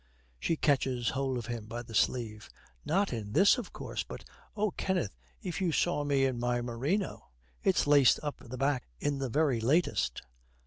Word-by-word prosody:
She 165 - +1
catches 130 -5 +1
hold 135 -1 -1
of 120 - -4
him 115 -2 -5
by 120 +2 -5
the 115 - -11
sleeve. 110 -2 0 0.3
'Not 195 0 +1
in 105 -3 -5
this, 195 - +6
of 235 - -7
course. - - -4
But, - - -8 0.3
oh, 210 -1 +1
Kenneth, 180 - -1 0.3
if 180 +1 -3
you 180 -3 +2
saw 160 -1 +1
me 140 -2 +2
in 130 -3 -1
my 120 0 +1
merino! 130 - -2 0.3
It's 190 - +2
laced 145 -4 +6
up 145 -1 -4
the 130 0 -7
back 135 0 0
in 145 -1 -1
the 135 -2 -2
very 135 -3 +2
latest.' 115 - +1
135 Hz, 180 wpm, -31 LUFS, 120-160 Hz, 0.3 s, this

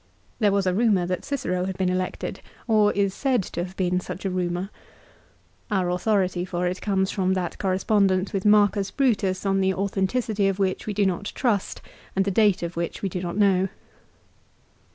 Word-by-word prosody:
There 210 -3 +3
was 200 -1 +1
a 185 - +2
rumour 205 -3 +2
that 180 0 -3
Cicero 185 -10 -2
had 190 -1 -4
been 185 -1 +1
elected, 185 0 -3 0.3
or 215 -2 +4
is 200 -1 +1
said 255 -5 +1
to 175 - -4
have 185 +1 -9
been 180 -1 +1
such 180 +1 -7
a 190 - 0
rumour. 180 +1 -2 1.0
Our 185 -4 +1
authority 185 -1 +1
for 180 -1 -2
it 180 +1 -2
comes 190 -2 0
from 190 -1 0
that 180 -2 -3
correspondence 190 0 +1
with 195 -1 -1
Marcus 205 -1 +4
Brutus 205 -9 0
on 195 0 +2
the 190 0 +1
authenticity 200 +2 0
of 195 -1 0
which 190 0 -1
we 210 - -2
do 205 0 +2
not 190 +2 -1
trust 225 -7 -1 0.3
and 195 0 +2
the 200 - 0
date 205 -2 +3
of 170 0 -4
which 170 +3 -4
we 195 - 0
do 180 0 -4
not 175 +1 -4
know. 195 -2 +3
190 Hz, 190 wpm, -24 LUFS, 185-205 Hz, 1.0 s, or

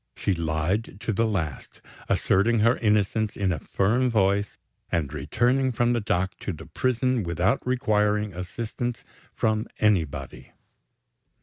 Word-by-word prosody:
She 100 - 0
lied 85 +5 -1
to 115 -1 -1
the 115 +3 +2
last; 85 - -4 0.3
asserting 110 +4 +2
her 115 +3 +4
innocence 105 0 +1
in 95 -2 +1
a 85 - -2
firm 120 +6 +1
voice, 100 -2 +1 0.3
and 75 -4 -1
returning 120 - +1
from 120 +1 +1
the 120 - 0
dock 95 -1 -1
to - - -3
the 80 -2 -9
prison 130 -1 0
without 90 +2 0
requiring 105 -5 +1
assistance 115 +6 -4 0.3
from 110 -1 0
anybody. 95 -9 -1
105 Hz, 130 wpm, -25 LUFS, 90-115 Hz, 0.3 s, her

